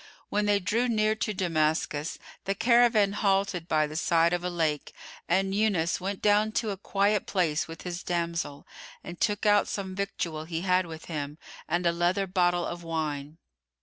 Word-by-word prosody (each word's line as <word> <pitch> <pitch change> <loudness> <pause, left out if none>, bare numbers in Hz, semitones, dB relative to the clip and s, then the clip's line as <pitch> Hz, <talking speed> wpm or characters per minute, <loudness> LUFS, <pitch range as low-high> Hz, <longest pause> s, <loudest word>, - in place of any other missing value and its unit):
When 210 0 0
they 205 -1 +3
drew 225 +6 0
near 215 -1 +2
to 220 - -1
Damascus, 160 -4 0 0.3
the 195 - 0
caravan 235 -3 +4
halted 195 -4 0
by 155 -3 +2
the 150 +1 -8
side 165 +1 +3
of 175 0 -1
a 180 - -1
lake 160 -4 -1 0.3
and 190 +2 +2
Yunus 195 -6 +1
went 195 +1 -4
down 210 +1 +3
to 220 -2 0
a - - -3
quiet 200 +1 +1
place 165 -5 0
with 165 0 -9
his 175 0 -4
damsel 170 -4 -3 0.4
and 175 0 -9
took 210 -1 0
out 205 -1 +4
some 190 -2 -4
victual 175 -5 -3
he 165 0 -3
had 185 -1 +2
with 160 -1 -9
him 150 -2 -5 0.3
and 175 +2 0
a 170 - +4
leather 175 +3 +1
bottle 175 -2 +1
of 175 0 -5
wine. 155 -2 -3
180 Hz, 180 wpm, -28 LUFS, 165-200 Hz, 0.4 s, caravan